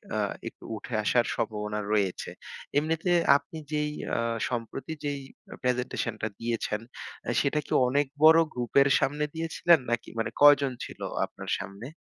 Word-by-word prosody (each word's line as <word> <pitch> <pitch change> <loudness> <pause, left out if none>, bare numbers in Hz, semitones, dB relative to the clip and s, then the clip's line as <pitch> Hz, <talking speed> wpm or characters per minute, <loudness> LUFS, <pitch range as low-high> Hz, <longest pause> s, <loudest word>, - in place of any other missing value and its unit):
আ - - +1 0.3
একটু - - -10
উঠে 115 +3 -8
আসার 120 +3 +3
সম্ভাবনা 105 0 -2
রয়েছে। 100 -4 0 0.5
এমনিতে 165 +4 +1 0.3
আপনি 165 +2 -11
যেই 150 0 0 0.2
আ - - +1 0.3
সম্প্রতি 125 +5 -4
যেই 145 -1 -2 0.4
প্রেজেন্টেশন 125 -2 -1
টা 110 - 0
দিয়েছেন 115 -2 -2 0.5
আ - - -1
সেটা 145 +2 +1
কি - - -16 0.2
অনেক 140 +3 +2 0.2
বড় 160 +1 +9
গ্রুপের 125 +3 +3
সামনে 150 +2 0
দিয়েছিলেন 165 0 +3
নাকি 120 0 -1
মানে 115 - -1
কয়জন 145 -2 +7
ছিল - - -11 0.3
আপনার - - -10
সামনে? 100 +4 -7
130 Hz, 145 wpm, -28 LUFS, 115-150 Hz, 0.5 s, বড়